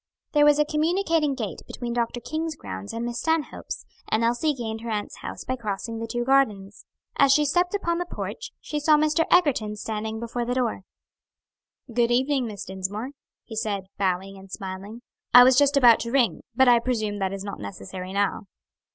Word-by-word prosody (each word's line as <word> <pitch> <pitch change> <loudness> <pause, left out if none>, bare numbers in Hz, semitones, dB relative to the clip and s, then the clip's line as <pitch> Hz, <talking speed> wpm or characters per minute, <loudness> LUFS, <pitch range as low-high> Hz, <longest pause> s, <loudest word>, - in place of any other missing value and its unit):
There 295 -1 +5
was 295 0 +6
a 300 - +3
communicating 320 -1 +1
gate 220 -6 -5
between 240 -1 -5
Dr. 235 0 -1
King's 315 +4 -3
grounds 95 - -7
and 230 +1 -4
Miss 240 0 -3
Stanhope's, 320 -2 -2 0.2
and 220 +1 +1
Elsie 240 +6 +1
gained 225 -3 -5
her 235 - -6
aunt's 210 -2 -3
house - - -7
by 255 - -2
crossing 225 0 -4
the 230 - -4
two 240 +1 -2
gardens. 215 -7 +1 0.3
As 275 -1 +5
she 300 +2 +4
stepped 355 +6 +1
upon 340 -4 -1
the 355 - -3
porch, - - -6
she 300 - -4
saw 300 +1 +5
Mr. 310 +2 +2
Egerton 270 -12 +3
standing 220 +1 -4
before 235 +1 -3
the 245 +1 -2
door. 245 -6 -1 1.1
"Good 235 0 +2
evening, 260 +1 +1
Miss 205 -3 -7
Dinsmore," 195 +6 -4 0.3
he 225 - -9
said, 210 -3 -2 0.2
bowing 195 0 -1
and 190 0 -14
smiling. 195 +5 -7 0.3
"I 245 - +12
was 255 +1 +6
just 285 +1 +4
about 240 -4 +7
to 235 - -4
ring; 255 -3 +2
but 265 -1 +5
I 240 -1 +7
presume 215 -4 -2
that 190 -1 -1
is 195 0 -5
not 200 - -6
necessary 105 - -7
now." 200 0 0
235 Hz, 190 wpm, -25 LUFS, 210-285 Hz, 1.1 s, I